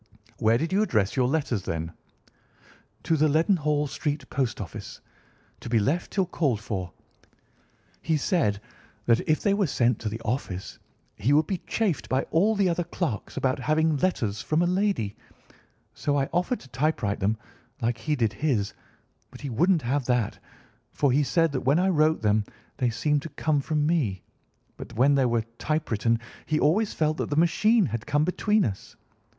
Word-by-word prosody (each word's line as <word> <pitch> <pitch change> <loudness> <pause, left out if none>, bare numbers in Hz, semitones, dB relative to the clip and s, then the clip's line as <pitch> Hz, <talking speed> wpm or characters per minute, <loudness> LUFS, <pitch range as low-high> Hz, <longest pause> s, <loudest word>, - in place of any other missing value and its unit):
"Where 115 0 +4
did 165 +7 -2
you 200 - +3
address 110 - +1
your 130 -2 +2
letters, 135 -7 0
then?" 80 -2 -4 1.1
"To 165 - +2
the 155 0 +3
Leadenhall 150 -2 +2
Street 145 0 -3
Post 130 -3 -1
Office, 95 -7 -7 0.6
to - - -8
be 115 - +3
left 140 +12 0
till 190 -2 +1
called 145 - 0
for. 95 -5 -4 1.1
He 160 -1 +1
said 140 - +1 0.5
that 115 0 +4
if 155 - +2
they 200 - +3
were 200 -3 +1
sent 120 -4 +1
to 110 - -3
the 110 +2 -5
office 105 -5 -4 0.4
he 115 +7 +2
would 150 +1 +4
be 190 +1 -2
chaffed 205 -10 -1
by 130 +1 +1
all 205 +7 +3
the 200 -2 +2
other 175 0 0
clerks 165 - -4
about 130 0 0
having 155 +4 +2
letters 115 - 0
from 155 +10 +1
a - - +2
lady, 180 - 0 0.8
so 145 -1 -1
I 135 -1 0
offered 180 +8 0
to - - -14
typewrite 125 -5 -1
them, 105 +2 +1 0.4
like 115 0 -1
he 150 +7 -1
did 115 -5 0
his, 110 -5 0 0.6
but - - -13
he 140 -3 -4
wouldn't 170 - +2
have 130 +2 0
that, 125 -3 0 0.5
for 140 -3 +1
he 140 +4 +3
said 165 +3 +2
that 130 - -2
when 135 +4 +3
I 185 +2 +2
wrote 155 -5 +2
them 105 0 +2 0.3
they 125 -2 +1
seemed 145 +6 0
to 160 - -7
come 145 0 0
from 150 +1 0
me, 135 - 0 0.5
but - - -9
when 135 +5 +4
they 135 -2 +3
were 115 -1 +1 0.2
typewritten 115 -6 0 0.3
he 155 -1 +1
always 205 +8 +2
felt 155 0 0
that - - -2
the 145 - -1
machine 210 +7 +4
had 115 -3 -4
come 145 +1 +2
between 210 +4 +2
us. 100 -5 -5
145 Hz, 180 wpm, -26 LUFS, 115-165 Hz, 1.1 s, Where